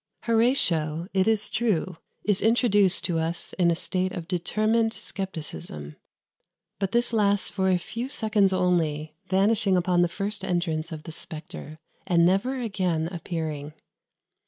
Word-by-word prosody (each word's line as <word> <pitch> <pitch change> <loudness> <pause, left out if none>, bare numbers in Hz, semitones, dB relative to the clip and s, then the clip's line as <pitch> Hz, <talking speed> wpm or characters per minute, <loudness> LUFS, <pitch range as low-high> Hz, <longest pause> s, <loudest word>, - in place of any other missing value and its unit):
Horatio, 180 - +2
it 190 +1 +2
is 215 -1 +3
true, 185 -6 0 0.3
is 205 -2 +2
introduced 205 -4 +3
to 165 -2 0
us 165 +1 -3
in 175 -1 +4
a 170 - +2
state 185 +2 -1
of 165 -2 -6
determined 215 +5 +1
scepticism; 80 - -6 0.8
but 195 -1 -1
this 235 0 +1
lasts 205 -2 +3
for 190 -1 0
a 185 - +4
few 230 +8 -5
seconds 215 -7 +2
only, 165 -5 0
vanishing 195 0 +3
upon 180 0 +2
the 175 - +4
first 200 +3 -4
entrance 170 -3 -1
of 155 -1 -7
the 165 - -8
spectre, 155 -1 -8 0.3
and 170 -2 +4
never 215 +9 +1
again 180 -8 -1
appearing. 155 -4 -4
185 Hz, 140 wpm, -26 LUFS, 165-210 Hz, 0.8 s, in